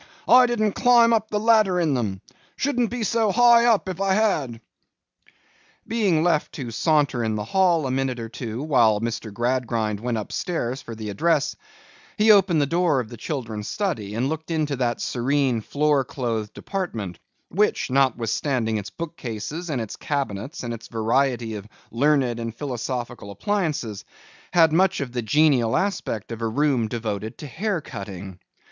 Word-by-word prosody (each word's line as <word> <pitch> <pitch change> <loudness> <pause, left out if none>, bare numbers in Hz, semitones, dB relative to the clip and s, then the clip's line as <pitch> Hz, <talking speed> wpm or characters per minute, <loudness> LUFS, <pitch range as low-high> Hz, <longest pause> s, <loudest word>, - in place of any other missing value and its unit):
'I 250 +1 +7
didn't 215 -3 +1
climb 235 -1 +5
up 220 -1 +1
the 210 - 0
ladder 215 -5 +4
in 160 -4 +1
them.—Shouldn't 135 - -3
be 245 -1 -3
so 220 -1 +1
high 235 +2 +6
up, 220 -5 +3
if 185 0 -4
I 195 -1 +2
had.' 155 - 0 1.3
Being 200 -9 +2
left 165 -3 +1
to 125 -5 -6
saunter 145 -2 +1
in 110 -1 -1
the 105 - -2
hall 175 - +2
a 130 - -1
minute 130 -1 -1
or 115 - -5
two 115 +2 -5
while 115 -8 +3
Mr. 115 -1 -4
Gradgrind 115 -2 -1
went 120 +1 -2
up 105 - -5
stairs 135 -7 -2
for 115 - -8
the 110 -1 -5
address, 155 +6 +1 0.6
he 215 0 +6
opened 190 -5 +5
the - - +2
door 165 -2 +2
of 115 -4 -4
the 120 - -8
children's 110 -5 -4
study 110 - -3
and 120 +4 0
looked 160 +2 -4
into 155 -3 0
that 120 -2 -1
serene 130 -1 0
floor 145 +3 +1
clothed 115 -6 -4
apartment, 115 - -4 0.3
which, 205 -7 +1
notwithstanding 125 -2 +1
its 105 0 -7
book 170 +4 -7
cases 135 +9 -5
and 140 -5 -1
its 110 -3 -5
cabinets 135 - -3
and 120 -1 -3
its 115 0 -9
variety 115 0 0
of 105 -1 -7 0.2
learned 130 -1 +2
and 115 -1 -5
philosophical 120 -4 -4
appliances, 150 - -2 0.5
had 165 -3 +5
much 190 +2 +3
of 135 -4 -4
the 125 0 -2
genial 130 -1 +3
aspect 175 - -2
of 115 0 -6
a 115 - 0
room 130 -1 +1
devoted 110 -2 -4
to - - -8
hair 185 - -2
cutting. 95 -5 -8
135 Hz, 165 wpm, -24 LUFS, 115-175 Hz, 1.3 s, I